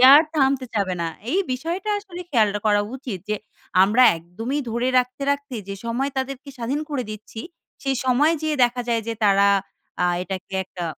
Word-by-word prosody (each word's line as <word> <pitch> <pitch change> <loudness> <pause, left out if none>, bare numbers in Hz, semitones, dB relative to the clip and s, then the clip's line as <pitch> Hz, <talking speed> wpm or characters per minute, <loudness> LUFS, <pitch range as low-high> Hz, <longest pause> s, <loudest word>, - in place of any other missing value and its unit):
আর 300 - +9
থামতে 270 -3 +2
চাবে 195 -3 0
না। - - 0 0.2
এই 365 - +2
বিষয়টা 340 +10 -3
আসলে 380 -4 -9
খেয়ালডা 210 -5 +2
করা 205 -1 +4 0.2
উচিত 245 -7 -5
যে, 215 - 0 0.5
আমরা 215 +6 +5
একদমই 225 - -4
ধরে 235 +3 0
রাখতে, 250 +2 -1
রাখতে 285 -1 -2
যে, 195 - -3
সময় 260 +4 -1
তাদেরকে 270 +1 -4
স্বাধীন 250 +5 -1
করে 280 -3 -1
দিচ্ছি, 215 +1 -8 0.4
সেই 270 -1 0
সময়ে 285 +6 +4
যেয়ে 310 -1 0
দেখা 245 +1 0
যায় 230 -1 +1
যে, 230 - -1
তারা 200 0 +5 0.5
আ - - +3 0.2
এটাকে 190 0 -6
একটা 180 -1 -6
250 Hz, 175 wpm, -23 LUFS, 210-280 Hz, 0.5 s, আর